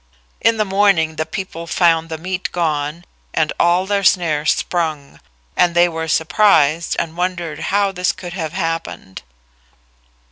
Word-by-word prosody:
In 230 0 +3
the 215 - +1
morning 190 -5 +2
the 155 - -2
people 170 -1 -6
found 165 -2 +2
the 160 - -4
meat 185 +3 -4
gone 155 -1 -2 0.3
and 160 -1 +1
all 175 +2 +3
their 200 0 0
snares 155 -5 +2
sprung, 155 -5 -3 0.4
and 175 -1 +2
they 175 0 +5
were 160 -1 -4
surprised 160 -2 +3
and 165 -1 -3
wondered 175 -3 -3
how 200 0 +2
this 180 -1 0
could 180 -2 -9
have 160 -4 -4
happened. 165 - -4
170 Hz, 145 wpm, -18 LUFS, 160-185 Hz, 0.4 s, they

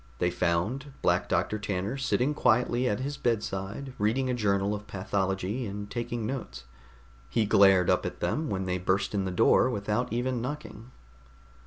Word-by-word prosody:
They 90 +4 +1
found 90 - -1
Black - - +2
Doctor 110 - 0
Tanner 100 +2 -2
sitting 135 +1 +1
quietly 125 -1 +2
at 105 +4 -1
his 140 +1 -3
bedside 110 +2 -2
reading 125 +5 +1
a - - 0
journal 100 -3 +1
of 105 0 -6
pathology 95 +4 -2
and 100 +1 -6
taking 120 -1 -3
notes. 110 - -5 0.7
He 110 +10 +1
glared 95 -3 +5
up - - +3
at - - -5
them 155 -1 -1
when 95 -1 -2
they 90 0 -1
burst 95 +3 0
in 100 -2 0
the - - -1
door 115 +6 +4
without 105 +2 -1
even 120 +1 -1
knocking. 125 -4 -6
105 Hz, 165 wpm, -28 LUFS, 95-125 Hz, 0.7 s, glared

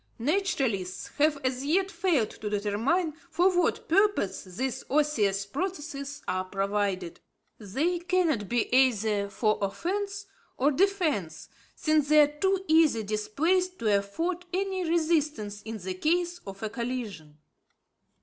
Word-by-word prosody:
Naturalists 270 - -1
have, 300 0 +4
as 255 0 -1
yet, 375 +7 +1
failed 335 - +1
to 210 - -6
determine 220 - 0 0.2
for 355 +3 +3
what 350 -1 +1
purpose 380 - +2
these 245 +8 -4
osseous 225 -10 +1
processes 290 - -5
are 185 0 0
provided. 195 -2 -2 0.4
They 280 - -1
cannot 340 - 0
be 240 -1 +1
either 220 -6 +3
for 215 +1 0
offence 395 - -2 0.3
or 280 +4 +3
defence, 310 - 0 0.3
since 310 -2 +1
they 305 0 +7
are 295 0 +1
too 385 +1 +1
easily 315 -8 +4
displaced 325 - 0
to 215 -3 +2
afford 335 - -3
any 375 -2 -1
resistance 305 -11 0
in 225 +1 -6
the 190 -2 -5
case 345 - 0
of 195 +2 -8
a 220 - -1
collision. 220 - -5
280 Hz, 130 wpm, -28 LUFS, 205-345 Hz, 0.4 s, they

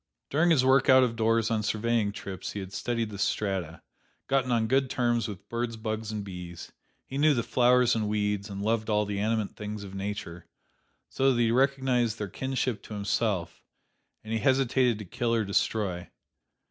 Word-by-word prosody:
During 160 +5 +3
his 140 -6 +4
work 130 0 +4
out 130 0 +8
of 120 -2 0
doors 115 0 +2
on 110 -1 +1
surveying 110 0 0
trips 95 -2 -6
he 105 - -4
had 95 0 -7
studied 115 -3 -2
the 100 - -7
strata; 95 -6 -2 0.4
gotten 135 -2 +1
on 115 -2 +2
good 135 +2 +2
terms 120 -2 +1
with 100 -4 -9
birds, 115 -1 -3
bugs 110 0 -4
and 105 -1 -4
bees; 90 -3 -8 0.3
he 135 - -5
knew 150 0 +5
the 115 - 0
flowers 125 0 +4
and 110 -2 -1
weeds, 105 -1 -1
and 100 0 -5
loved 110 0 0
all 105 0 +2
the 100 -1 -3
animate 110 0 -1
things 105 -1 -6
of 95 -1 -9
Nature, 95 -4 -5 0.6
so 135 0 +2
that 120 - 0
he 115 -1 +3
recognized 130 -3 +2
their 105 - -3
kinship 130 -2 -2
to 105 - -9
himself, 100 -3 -1 0.6
and 110 +1 -5
he 115 - +1
hesitated 130 -2 +2
to 105 - -8
kill 120 +4 -1
or 110 -2 +1
destroy. 100 -3 -1
110 Hz, 185 wpm, -28 LUFS, 105-125 Hz, 0.6 s, out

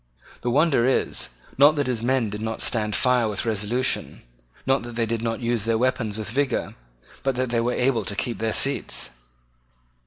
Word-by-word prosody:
The 120 - -1
wonder 140 -2 +3
is, 130 - 0 0.3
not 145 +2 +7
that 145 -1 0
his 125 -3 -1
men 120 -3 +1
did 105 +1 -5
not 110 0 -2
stand 105 -3 +2
fire 125 +1 +2
with 105 - -3
resolution, 110 +3 -1 0.4
not 135 +1 +2
that 120 0 -8
they 115 -1 +1
did 115 0 -2
not 115 0 -2
use 115 -3 0
their 115 -1 +2
weapons 115 -3 0
with 110 0 -4
vigour, 135 0 -1 0.5
but 135 -1 0
that 130 -1 -1
they 115 -1 +2
were 120 +1 0
able 125 -3 +1
to 100 - -4
keep 120 +3 -3
their 110 0 0
seats. 140 +5 0
120 Hz, 190 wpm, -24 LUFS, 110-130 Hz, 0.5 s, not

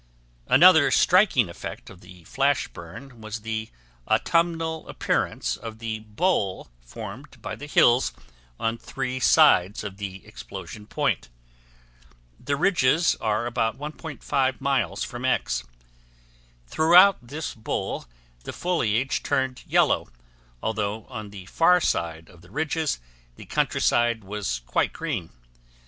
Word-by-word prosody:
Another 170 -5 +7
striking 180 - +4
effect 85 - -8
of 90 - -15
the 90 -1 -15
flash 140 - +1
burn 115 +9 -11
was 110 +1 -6
the 110 0 -4 0.4
autumnal 165 -1 0
appearance - - -1
of 115 -1 -8
the 110 -1 -4
bowl 105 - -1
formed - - -9
by - - -5
the 145 - -9
hills 125 -3 +4 0.5
on 115 +1 -1
three 130 -1 -4
sides 110 - +4
of 100 -2 -7
the 100 -2 -7
explosion 105 -1 -9
point. - - -1 1.1
The 140 - -1
ridges 165 -1 +3
are 110 +1 0
about 115 -2 -1
1.5 145 -3 -2
miles 130 - 0
from 120 0 -6
X. 65 - 0 1.0
Throughout 175 - +6
this 140 +5 -6
bowl 110 - -4 0.4
the - - -6
foliage 135 -8 0
turned 130 -1 -1
yellow, - - +2 0.6
although 105 -1 -2
on 110 -5 -7
the 100 -2 -10
far 180 - +4
side 85 - -2
of 85 -2 -18
the 85 - -18
ridges 155 - -1 0.4
the - - -12
countryside 120 -2 +1
was 95 -11 -3
quite 60 - 0
green. 125 - -4
120 Hz, 125 wpm, -25 LUFS, 100-145 Hz, 1.1 s, Another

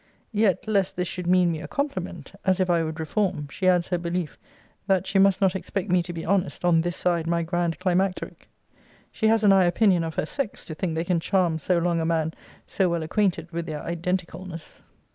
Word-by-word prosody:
Yet, 210 -2 +1
lest 200 -3 +1
this 180 0 -1
should 180 0 -5
mean 180 -1 +4
me 160 -1 -4
a - - -7
compliment, 185 - -4
as 190 0 +2
if 185 -1 +2
I 170 -1 +3
would 160 0 -4
reform, 165 -2 -1
she 185 +5 -2
adds 180 -2 +3
her 180 -2 0
belief, 170 -1 -3 0.5
that 190 -3 +2
she 195 0 +1
'must 195 -1 +4
not 190 -1 +3
expect 195 0 -3
me 180 -1 +4
to 175 +1 -6
be 165 -1 -6
honest 190 -1 0
on 165 -2 +4
this 175 +1 -2
side 170 -2 0
my 170 0 +1
grand 170 0 -1
climacteric.' 185 0 -1 0.6
She 220 - 0
has 220 0 +3
an 205 - +6
high 190 -2 +5
opinion 175 0 +3
of 160 -1 -4
her - - 0
sex, 230 - -4
to 155 - -6
think 160 +1 -3
they 165 - 0
can 175 -1 +1
charm 170 -2 +1
so 180 +4 +1
long 170 0 +1
a - - -1
man 160 -1 0 0.3
so 190 -2 +1
well 170 -1 -1
acquainted 170 -1 0
with 170 0 -4
their 150 -2 -5
identicalness. 175 0 -4
175 Hz, 220 wpm, -25 LUFS, 165-190 Hz, 0.6 s, an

